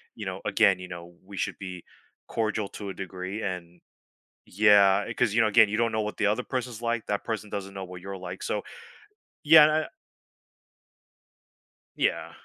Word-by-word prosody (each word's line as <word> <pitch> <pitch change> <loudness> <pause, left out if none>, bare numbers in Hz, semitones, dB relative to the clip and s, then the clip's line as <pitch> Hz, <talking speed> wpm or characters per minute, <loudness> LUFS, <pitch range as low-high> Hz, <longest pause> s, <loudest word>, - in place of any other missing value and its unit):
you - - -7
know - - -5
again, 95 -2 +3
you 90 - -8
know, 85 -1 -9
we 100 +1 -11
should - - -2
be 90 -3 -7 0.4
cordial 110 -2 -1
to 100 -1 -7
a - - -5
degree 95 +2 -6
and 90 -2 -6 0.7
yeah, 100 0 +4
'cause, 120 -4 +1
you 115 - +2
know, 115 - +5
again, 110 0 +6
you 105 - -1
don't 115 -1 +2
know 110 0 0
what 105 - -5
the - - +2
other 105 +4 +1
person's 125 -3 -4
like, 115 -1 -1
that 100 -1 -2
person 110 -2 -4
doesn't 100 -1 -5
know 95 -1 -5
what 90 0 -10
you're 100 0 -6
like, 95 - -8
so, - - -2 0.8
yeah, 155 0 +9
and, 155 - +5
I 155 0 0 2.1
Yeah. - - -1
105 Hz, 185 wpm, -27 LUFS, 95-115 Hz, 2.1 s, yeah